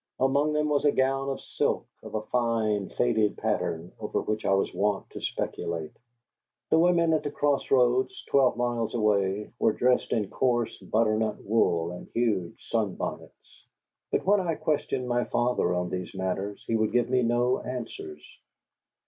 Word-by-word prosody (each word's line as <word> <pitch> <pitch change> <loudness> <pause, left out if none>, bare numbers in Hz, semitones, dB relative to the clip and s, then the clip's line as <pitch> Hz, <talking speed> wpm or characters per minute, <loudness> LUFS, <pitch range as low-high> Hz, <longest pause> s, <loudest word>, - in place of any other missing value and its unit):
Among 140 +3 +2
them 150 0 +1
was 145 -1 +1
a 145 - +5
gown 135 +1 +1
of 135 - -3
silk, - - -1 0.2
of - - -8
a 110 - -1
fine, 110 -4 0
faded 110 -4 +1
pattern, 85 +2 -2
over - - -2
which 110 0 -3
I 95 - +3
was 95 - 0
wont 100 -1 0
to - - -8
speculate. 80 -2 -3 0.8
The 160 - +5
women 170 -1 +4
at 155 - +2
the 145 - -3
Cross 145 -1 0
Roads, 125 0 +2
twelve 135 -3 +3
miles 120 -2 -1
away, 105 -2 +1
were 110 - +3
dressed 125 0 +2
in 105 -4 +1
coarse 120 -3 +1
butternut 110 -1 0
wool 85 -6 +1
and 90 - -9
huge 105 -8 -1
sunbonnets. 110 -5 -4 0.5
But - - 0
when 205 +2 +4
I 170 -4 -1
questioned 140 -5 -1
my 120 0 +1
father 120 -6 +1
on 90 0 -2
these 90 +1 -5
matters 95 +2 -3
he 115 - 0
would 110 -1 +1
give 120 -1 +3
me 130 0 +2
no 120 +1 +2
answers. 115 -12 -6
115 Hz, 165 wpm, -27 LUFS, 105-130 Hz, 0.8 s, a